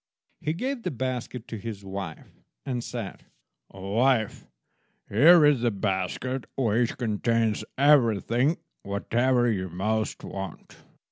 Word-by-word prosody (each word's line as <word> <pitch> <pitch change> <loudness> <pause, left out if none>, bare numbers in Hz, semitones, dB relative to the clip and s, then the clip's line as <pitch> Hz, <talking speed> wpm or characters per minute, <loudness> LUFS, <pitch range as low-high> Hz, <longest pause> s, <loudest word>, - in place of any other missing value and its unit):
He 155 0 -1
gave 255 +8 -3
the - - -2
basket 125 -2 -4
to 115 - -5
his 100 -1 -7
wife, 95 0 -6 0.3
and 125 -4 -2
said— 115 -6 -6 0.4
"Wife, 110 +4 0 0.6
here 155 - +7
is 145 -5 +4
a 120 - +4
basket 100 +5 -2
which 120 -2 +1
contains 115 -1 0
everything, 130 - +3 0.2
whatever 120 +5 +1
you 95 -3 -2
most 110 +5 -2
want. 95 -1 -7
115 Hz, 115 wpm, -26 LUFS, 100-130 Hz, 0.6 s, here